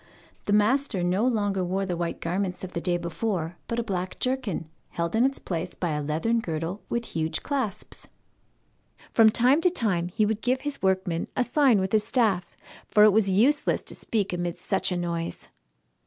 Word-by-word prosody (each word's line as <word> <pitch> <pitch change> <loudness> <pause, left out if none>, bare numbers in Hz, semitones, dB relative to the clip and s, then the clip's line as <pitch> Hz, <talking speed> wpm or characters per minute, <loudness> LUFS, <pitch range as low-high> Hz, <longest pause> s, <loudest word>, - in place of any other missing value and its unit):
The 205 - +1
master 210 -1 +2
no 185 +7 +2
longer 205 -5 0
wore 190 +2 -1
the 180 -2 -2
white 170 0 -3
garments 180 +2 -2
of 185 - -6
the 170 - -3
day 175 0 +1
before, 170 0 -3
but 230 - -2
a 235 - 0
black 185 -4 -3
jerkin, 250 -11 -2 0.2
held 170 +2 -2
in 230 - +4
its 270 +1 +1
place 175 0 -4
by 175 -3 -2
a 150 0 -1
leathern 160 +11 0
girdle 165 0 -4
with 235 0 -1
huge 160 0 -1
clasps. 265 -8 -3 1.0
From 225 -2 +6
time 250 +7 +4
to 360 - +4
time 200 - 0
he 210 +4 +1
would 220 +1 -1
give 255 +1 0
his 290 -1 -4
workmen 185 -3 0
a 250 - +3
sign 250 -3 +3
with 190 0 -1
his 215 -1 +3
staff, 210 -8 0 0.3
for 210 - +5
it 210 -1 +7
was 210 -2 +3
useless 245 +10 +2
to - - -4
speak 205 -5 -2
amid 175 -1 -2
such 195 -1 -1
a 180 - 0
noise. 170 -1 -4
195 Hz, 190 wpm, -26 LUFS, 175-230 Hz, 1.0 s, it